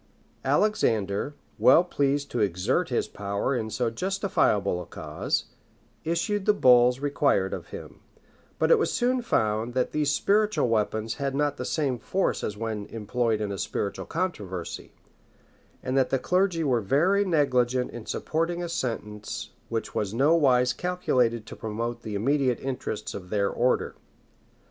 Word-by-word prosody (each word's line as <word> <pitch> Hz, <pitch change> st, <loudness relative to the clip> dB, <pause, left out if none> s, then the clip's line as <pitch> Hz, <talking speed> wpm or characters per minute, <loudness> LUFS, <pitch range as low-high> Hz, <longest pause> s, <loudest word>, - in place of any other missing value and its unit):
[*] -, -, -36 dB
Alexander, 115 Hz, -, 0 dB, 0.2 s
well 155 Hz, +7 st, +7 dB
pleased 145 Hz, -4 st, 0 dB
to 120 Hz, -, -2 dB
exert 90 Hz, -4 st, +1 dB
his -, -, 0 dB
power 100 Hz, +6 st, -2 dB
in 110 Hz, -3 st, -2 dB
so 115 Hz, +2 st, -1 dB
justifiable 115 Hz, -, 0 dB
a -, -, -8 dB
cause, -, -, -3 dB, 0.6 s
issued 180 Hz, +5 st, -1 dB
the 210 Hz, -, +5 dB
bulls 125 Hz, -4 st, +5 dB
required 140 Hz, -9 st, +1 dB
of -, -, -6 dB
him; -, -, -10 dB, 0.6 s
but -, -, +2 dB
it 475 Hz, -, +6 dB
was -, -, +1 dB
soon 250 Hz, +1 st, +1 dB
found, 110 Hz, -, 0 dB
that 125 Hz, -, +1 dB
these 150 Hz, -1 st, +1 dB
spiritual 210 Hz, +5 st, +2 dB
weapons 110 Hz, 0 st, 0 dB
had 135 Hz, -1 st, -1 dB
not 145 Hz, 0 st, 0 dB
the -, -, -4 dB
same 135 Hz, -6 st, -1 dB
force 190 Hz, +10 st, -1 dB
as 105 Hz, -, -3 dB
when 110 Hz, -2 st, -4 dB
employed 115 Hz, 0 st, -1 dB
in 105 Hz, -2 st, -2 dB
a 100 Hz, -, -4 dB
spiritual 100 Hz, -, -3 dB
controversy; 100 Hz, -, -4 dB, 0.9 s
and 130 Hz, -, -2 dB
that 135 Hz, -2 st, +3 dB
the 135 Hz, -, +2 dB
clergy 180 Hz, +3 st, +1 dB
were 125 Hz, -6 st, +2 dB
very 170 Hz, -, +3 dB
negligent 130 Hz, -8 st, +1 dB
in 120 Hz, -2 st, -9 dB
supporting 170 Hz, +2 st, -1 dB
a 170 Hz, -, -4 dB
sentence 105 Hz, -8 st, -4 dB, 0.2 s
which 115 Hz, -1 st, -3 dB
was 105 Hz, 0 st, -2 dB
nowise 135 Hz, -3 st, +4 dB
calculated 125 Hz, -11 st, 0 dB
to -, -, -9 dB
promote 115 Hz, +2 st, -4 dB
the 110 Hz, -2 st, -5 dB
immediate 130 Hz, +3 st, +1 dB
interests 130 Hz, -5 st, -4 dB
of 90 Hz, -2 st, -8 dB
their 100 Hz, -1 st, +1 dB
order. 125 Hz, +1 st, +1 dB
125 Hz, 155 wpm, -26 LUFS, 110-160 Hz, 0.9 s, well